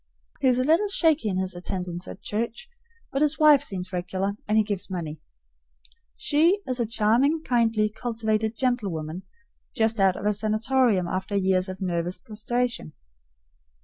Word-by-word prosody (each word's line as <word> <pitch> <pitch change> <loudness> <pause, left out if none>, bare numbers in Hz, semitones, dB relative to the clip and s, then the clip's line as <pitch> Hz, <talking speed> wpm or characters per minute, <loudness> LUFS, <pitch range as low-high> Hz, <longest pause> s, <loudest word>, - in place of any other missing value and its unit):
He 270 - +2
is 250 -1 +4
a 255 - +2
little 325 +9 +3
shaky 320 - +2
in 185 - -1
his 185 0 -1
attendance 180 0 -5
at 195 - -10
church, 235 - -3 0.4
but 275 - -1
his 300 0 +2
wife 300 -3 +6
seems 185 -8 -5
regular, 185 +2 -2
and 215 +1 +2
he 215 - +5
gives 205 -2 -3
money. 160 -5 -5 1.0
She 330 +7 +3
is 255 -1 -2
a 235 - 0
charming, 250 +8 +2
kindly, 225 -4 +2
cultivated 220 0 -2
gentlewoman, 185 -10 -2 0.5
just 225 0 +1
out 190 -1 +4
of 195 - -6
a 210 - +3
sanatorium 215 -1 +1
after 190 +3 -3
a - - +3
year 190 -1 +2
of 185 +1 -7
nervous 175 -1 -1
prostration. 235 -4 -3
215 Hz, 160 wpm, -25 LUFS, 185-250 Hz, 1.0 s, wife